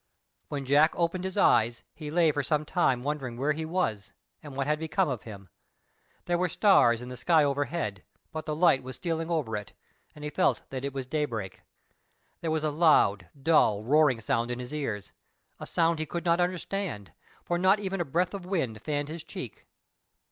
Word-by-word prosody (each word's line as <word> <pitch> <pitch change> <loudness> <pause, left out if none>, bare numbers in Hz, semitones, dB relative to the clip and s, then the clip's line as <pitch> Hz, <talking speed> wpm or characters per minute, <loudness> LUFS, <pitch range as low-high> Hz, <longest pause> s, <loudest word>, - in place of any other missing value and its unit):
When 140 -2 -4
Jack 145 +4 +4
opened 175 +2 -1
his 190 +1 -4
eyes 115 - +3
he 150 0 -7
lay 165 0 +3
for 145 - -1
some 150 +2 0
time 135 -7 +1
wondering 135 -5 -3
where 140 +4 +1
he 160 +1 -3
was 155 - -2 0.3
and 145 -3 -10
what 135 - 0
had 150 +1 0
become 160 -1 0
of 130 -6 -4
him. 100 -4 -10 0.8
There 175 0 0
were 180 0 +1
stars 125 - +4
in 125 - -8
the 125 - -6
sky 155 +5 +3
overhead, 145 - -1 0.3
but 155 0 -6
the 155 - -1
light 155 -5 +4
was 130 0 -7
stealing 165 -1 -3
over 150 -10 -1
it, 105 -1 -6 0.4
and 150 - -11
he 150 - -4
felt 185 +5 +1
that 130 -1 -4
it 140 - -2
was 135 -1 -4
daybreak. 125 -9 -3 0.8
There 165 - -3
was 155 -1 0
a 155 - +1
loud, 125 - +3
dull, 135 -9 +3
roaring 145 -1 +4
sound 115 +2 0
in 125 - -3
his 125 +2 -7
ears—a 115 -10 -7
sound 165 -2 +1
he 155 - -3
could 170 +2 -4
not 170 0 +3
understand, 180 - -3 0.3
for 175 0 -1
not 190 +3 +4
even 195 -2 -2
a - - -1
breath 175 +6 0
of 195 -2 -5
wind 145 - -2
fanned 145 0 -2
his 160 +1 -6
cheek. 130 -7 -9
150 Hz, 195 wpm, -28 LUFS, 125-170 Hz, 0.8 s, Jack